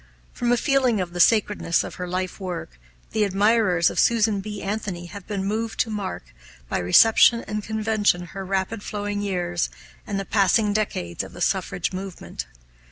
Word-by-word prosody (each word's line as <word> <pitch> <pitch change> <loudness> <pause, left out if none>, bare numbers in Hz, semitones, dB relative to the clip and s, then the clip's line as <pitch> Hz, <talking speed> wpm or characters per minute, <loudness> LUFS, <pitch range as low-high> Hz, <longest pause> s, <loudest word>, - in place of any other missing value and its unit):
From 240 0 0
a 245 - +4
feeling 260 -4 +2
of 175 -2 -3
the 175 - -5
sacredness 205 -3 +3
of - - -7
her 180 - -3
life 185 +2 -3
work, 175 - -6 0.3
the 215 - +1
admirers 200 -3 +3
of - - -2
Susan 220 -3 +3
B. 210 0 -6
Anthony 195 -4 -3
have 195 +1 -10
been 200 -2 -3
moved 220 +2 -2
to 225 - -2
mark, 200 - -5 0.3
by - - -1
reception 225 - +6
and 210 0 -4
convention, 215 -4 +1
her 195 0 -5
rapid 195 +3 -2
flowing 205 0 -3
years 175 -3 -1 0.4
and 200 -2 -2
the 195 - -4
passing 205 +1 +3
decades 145 - -2
of - - -10
the - - -10
suffrage - - -1
movement. 190 -1 -6
200 Hz, 170 wpm, -24 LUFS, 185-215 Hz, 0.4 s, reception